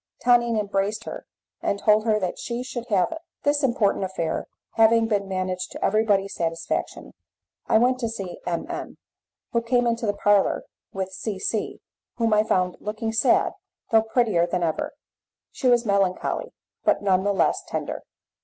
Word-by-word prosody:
Tonine 240 -2 +4
embraced 205 +1 -1
her, - - -8 0.3
and 200 - 0
told 215 +1 +3
her 215 -2 +3
that 185 -3 -3
she 240 +1 -3
should 245 -1 -6
have 195 - +2
it. 325 - -5 0.2
This 290 0 +2
important 235 -7 +2
affair 170 -4 -2 0.2
having 225 0 +4
been 205 -3 0
managed 185 -1 -2
to - - -2
everybody's 205 -2 +2
satisfaction, 165 -1 -3 0.5
I - - +5
went 250 +2 +3
to 230 -3 -1
see 195 -5 -6
M 170 +6 -1
M, 350 0 -6 0.5
who 235 - +1
came 245 +1 +2
into 230 -1 0
the 205 - 0
parlour 205 -1 +3 0.3
with 190 -1 -4
C 195 +2 -4
C, 210 +2 -3 0.3
whom 230 -2 +1
I 210 - +5
found 185 -4 0
looking 215 +2 -3
sad, 225 - +3 0.4
though 225 -1 +6
prettier 220 -6 +2
than 175 0 -1
ever. 160 -2 -2 0.6
She 260 - -2
was 240 -1 +4
melancholy, 200 -3 0 0.3
but - - +2
none 190 -2 +3
the 205 - +2
less 195 - +1
tender. - - -4
215 Hz, 165 wpm, -24 LUFS, 190-235 Hz, 0.6 s, though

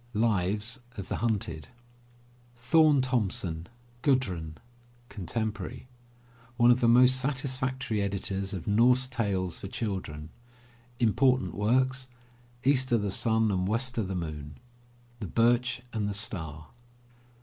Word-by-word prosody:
Lives 105 +2 0 0.2
of 100 - -6
the - - -2
Hunted. 100 -9 -2 0.9
THORNE 150 +4 +4
THOMSEN, 95 -9 -2 0.3
GUDRUN 95 - 0 0.5
(Contemporary) 110 +5 -4 0.7
One 120 0 +6
of 120 - +3
the 120 - +4
most 125 +2 +6
satisfactory 130 -4 -2
editors 100 0 -2
of 95 -6 -5
Norse 125 +5 +4
Tales 100 -8 -2
for - - -6
children. 95 -8 -4 0.7
Important 130 +3 +2
Works: 130 +5 +1 0.6
East 130 -1 +3
'0 120 - +3
the 100 -1 -2
Sun 110 +2 +2
and 95 -1 0
West 120 +4 -1
'0 110 -5 -2
the 95 - -3
Moon. 75 -4 -6 0.6
The 105 - -5
Birch 120 +4 +2
and 105 -2 -1
the 100 - -3
Star. 80 -8 -1
110 Hz, 120 wpm, -28 LUFS, 95-125 Hz, 0.9 s, One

